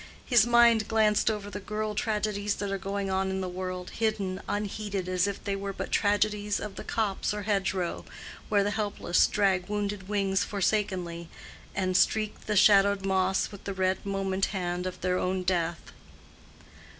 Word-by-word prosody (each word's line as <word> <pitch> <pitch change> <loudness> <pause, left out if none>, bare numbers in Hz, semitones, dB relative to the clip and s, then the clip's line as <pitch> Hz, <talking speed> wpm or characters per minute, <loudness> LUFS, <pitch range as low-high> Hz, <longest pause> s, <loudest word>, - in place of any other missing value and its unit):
His 240 -3 +5
mind 235 -2 +5
glanced 220 -1 +3
over 205 -2 -4
the 205 - -5
girl 215 +1 -3
tragedies 210 -1 -1
that 205 -1 -3
are 195 - -2
going 195 0 -3
on 190 0 0
in 190 0 -2
the 185 - -2
world, 185 0 -5
hidden, 205 -4 -1
unheeded, 205 -2 -3
as 185 +1 +1
if 200 - -5
they 200 - -1
were 195 0 -4
but - - -5
tragedies 205 0 +1
of 210 -2 -6
the - - -7
copse 210 -2 -1
or 210 - -4
hedgerow, 195 -3 -1 0.5
where 205 -2 +3
the 205 - 0
helpless 205 -4 +1
drag 190 -3 +1
wounded 205 -2 -3
wings 195 -2 +1
forsakenly, 185 -5 -1 0.5
and 185 -1 0
streak 215 +2 +1
the 210 - 0
shadowed 200 -1 +5
moss 190 0 +1
with 200 - -12
the 195 - -4
red 185 0 0
moment 195 -1 0
hand 180 -2 -3
of 185 - -6
their 180 0 +1
own 185 0 -1
death. 175 -2 -1
200 Hz, 170 wpm, -28 LUFS, 185-210 Hz, 0.5 s, His